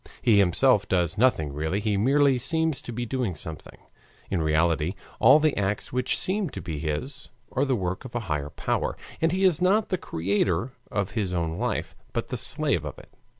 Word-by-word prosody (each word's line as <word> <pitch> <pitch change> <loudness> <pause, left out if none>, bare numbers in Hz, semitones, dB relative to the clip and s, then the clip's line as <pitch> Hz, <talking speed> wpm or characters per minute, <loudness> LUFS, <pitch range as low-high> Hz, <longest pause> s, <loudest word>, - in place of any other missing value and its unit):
He 110 -4 +4
himself 100 +4 +3
does 90 -2 +1
nothing 105 - +2
really, 80 +7 -1
he 105 0 0
merely 135 +5 +3
seems 160 +2 +1
to - - -7
be 120 +1 -3
doing 120 -7 -2
something. 80 0 -9 0.5
In 90 -4 +1
reality 80 +2 +1 0.2
all 130 +6 +8
the 155 -1 +2
acts 100 +3 -2
which 125 0 +1
seem 195 -1 +1
to 100 - -7
be 80 -4 -5
his 85 - -4 0.2
are 135 +2 +1
the 135 -2 +1
work 95 -1 -3
of 130 -2 -10
a 120 - 0
higher 75 -8 -3
power, - - -2 0.2
and 165 0 +3
he 190 +2 0
is 180 -3 +3
not 205 +4 +3
the 185 - -1
creator 95 +5 0 0.2
of 100 -3 -2
his 100 -5 -2
own 85 -1 -2
life, - - -2 0.2
but - - -2
the - - -3
slave - - 0
of - - -6
it. - - -15
105 Hz, 195 wpm, -26 LUFS, 85-135 Hz, 0.5 s, all